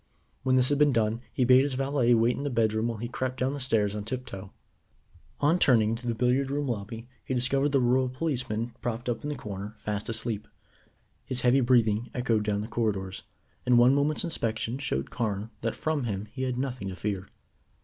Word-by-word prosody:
When 130 0 +2
this 130 0 +5
had 145 0 +1
been 150 -1 +5
done 115 0 +1
he 125 - +1
bade 130 +1 +7
his 140 -2 -1
valet 135 -3 +2
wait 115 +2 +3
in - - -5
the 145 - -1
bedroom 110 -2 +1
while 115 -2 -3
he 120 +3 -4
crept 130 +1 -3
down 130 +2 +1
the 145 - -4
stairs 110 -6 +1
on 105 - -3
tip 125 +4 -4
toe. 95 -2 -8 0.9
On 155 +5 +3
turning 110 -8 +4
into 115 +2 -4
the 115 - 0
billiard 125 +3 +1
room 145 +1 -1
lobby, 115 0 -4 0.2
he 130 - -2
discovered 135 +3 +2
the 140 -1 +3
rural 130 +1 +2
policeman 125 -5 -2
propped 120 0 -3
up 115 -2 -1
in 145 - -4
the 150 - -2
corner 105 -2 -6
fast 105 +1 -3
asleep. 110 -2 -2 0.8
His 125 -1 -1
heavy 130 +2 +4
breathing 120 -2 +3
echoed 120 -4 +1
down 105 -1 0
the 105 - -5
corridors, 100 -5 -2 0.4
and 125 -1 +4
one 120 +2 +6
moment's 145 +2 +1
inspection 115 -6 -2
showed 70 - -2
Carne 110 -2 -2
that 115 0 -1
from 155 -4 -1
him 100 -2 -3
he 130 - -6
had 130 -1 -1
nothing 125 -6 -3
to 95 - -5
fear. 100 -1 -3
120 Hz, 210 wpm, -28 LUFS, 110-130 Hz, 0.9 s, bade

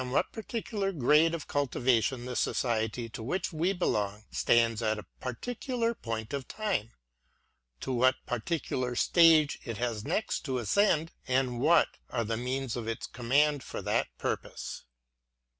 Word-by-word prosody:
what 130 - +1
particular 220 -3 -3
grade 155 +2 +4
of 165 - -7
cultivation 130 -3 +1
the 125 -1 -5
society 115 -1 0
to 115 - -8
which 175 +10 -2
we 165 +4 +1
belong 105 - -1
stands 115 -1 +3
at 110 -1 +1
a 105 - -8
particular 235 - -2
point 115 - -5
of 140 -2 -3
time; 205 - -2 0.5
— - - -46
to - - -3
what 130 +1 +4
particular 125 -1 -2
stage 160 0 +5
it 115 -4 -5
has 115 -3 -2
next 215 - -1
to 130 -4 -3
ascend, 165 - +2 0.2
and 125 -2 +1
what 160 +6 +4
are 120 -2 -1
the 115 +1 -1
means 125 +1 -2
at 120 -2 -4
its 115 - -3
command 140 +4 +2
for - - -6
that - - 0
purpose. - - -4
130 Hz, 150 wpm, -30 LUFS, 115-165 Hz, 0.5 s, stage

